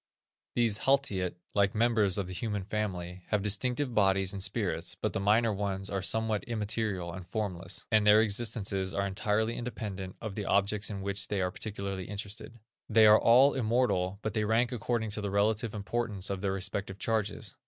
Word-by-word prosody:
These 115 -3 +3
haltiat, 105 -10 +1 0.2
like 100 0 +2
members 110 -4 +2
of 100 - -1
the 90 - -7
human 105 0 -3
family, 95 -3 -4
have 105 -2 0
distinctive 125 +6 +1
bodies 95 -2 +2
and 100 - -5
spirits; 95 -5 -1
but - - -1
the - - -1
minor 110 +3 +3
ones 95 -1 -2
are 100 -1 -1
somewhat 110 +2 0
immaterial 105 -6 -2
and 95 -1 -8
formless, 95 -2 -4
and 110 -2 +4
their 105 +1 +8
existences 100 -4 0
are 100 - 0
entirely 105 +3 0
independent 105 -6 -5
of 110 -3 -5
the 105 0 -4
objects 100 +2 +1
in 100 -2 -5
which 100 0 -1
they 100 - -1
are 90 -1 0
particularly 100 -2 -5
interested. 105 +3 -7 0.3
They 110 -1 +6
are 105 0 +7
all 130 +5 +6
immortal, 110 -6 +1
but 110 - -2
they 110 -1 0
rank 115 +3 +2
according 115 -2 -2
to 105 - -1
the 100 - -2
relative 105 +2 +1
importance 105 -1 -2
of 95 -1 -3
their 95 -1 0
respective 95 0 -3
charges. 110 -1 -2
105 Hz, 180 wpm, -30 LUFS, 95-110 Hz, 0.3 s, their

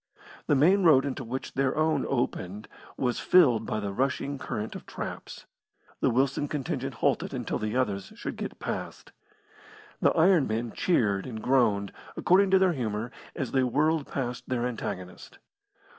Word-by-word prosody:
The 145 - +4
main 180 +9 +5
road 155 -7 +6
into 140 - -3
which 130 +3 -5
their 135 -1 +1
own 155 0 +1
opened 105 -5 -2 0.3
was 125 -2 0
filled 140 -12 +4
by 110 - -1
the 100 -1 -4
rushing 135 +3 -1
current 110 -3 -4
of - - -9
traps. - - -7 0.5
The - - +2
Wilson 135 +4 +1
contingent 145 -2 -3
halted - - 0
until - - -3
the 110 +2 -3
others 100 -6 -1
should - - -5
get - - -6
past. - - -6 0.9
The - - +5
iron 170 -3 +4
men 115 +1 -2
cheered 105 - +1
and 115 -3 -6
groaned, 110 -5 +2 0.3
according 190 +2 +4
to 190 - +6
their 185 -2 +3
humour, 115 -3 -3 0.2
as 130 - -3
they 135 - +2
whirled 150 +4 +1
past 125 -2 -4
their 125 -2 0
antagonist. 95 -7 -6
130 Hz, 160 wpm, -28 LUFS, 110-145 Hz, 0.9 s, road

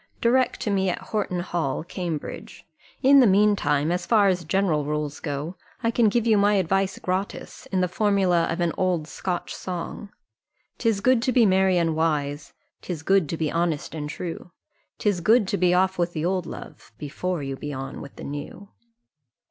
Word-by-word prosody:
Direct 250 +2 +2
to 210 - -1
me 190 -1 +1
at 175 - -1
Horton 195 -4 -2
hall, 165 -6 -2
Cambridge. 170 -3 -6 0.4
In 275 +1 +7
the 250 - +6
mean 205 +2 +4
time, 145 -2 +1
as 180 0 -1
far 210 -3 +5
as 180 -2 0
general 170 -3 +1
rules 150 0 -3
go, 150 +4 -4 0.3
I 230 - +2
can 230 -2 +3
give 235 +2 0
you 220 -3 +4
my 205 +1 +4
advice 195 +1 +1
gratis, 185 +2 -4
in 190 -1 0
the 180 - +2
formula 185 -3 +2
of 170 - -2
an 170 -1 +1
old 180 -4 0
Scotch 180 +1 -4
song 185 +3 -6 0.7
"'Tis 225 -4 +1
good 255 +1 +3
to 255 - +1
be 245 -2 +5
merry 190 -1 +3
and 165 -2 +1
wise, 145 -3 -1 0.3
'Tis 165 -4 -5
good 195 -4 +3
to 165 - -2
be 155 -2 -1
honest 165 -4 -1
and 150 -2 -4
true, 170 +2 -6 0.5
'Tis 205 -4 0
good 215 +3 +4
to 200 - 0
be 180 -1 +3
off 185 +1 +2
with 175 0 0
the 155 0 -2
old 185 -1 -1
love - - -10
Before 160 +2 -3
you 135 0 -4
be 145 +2 -6
on 135 -1 -6
with 140 - -11
the - - -10
new. 145 +7 -7
180 Hz, 190 wpm, -24 LUFS, 160-200 Hz, 0.7 s, In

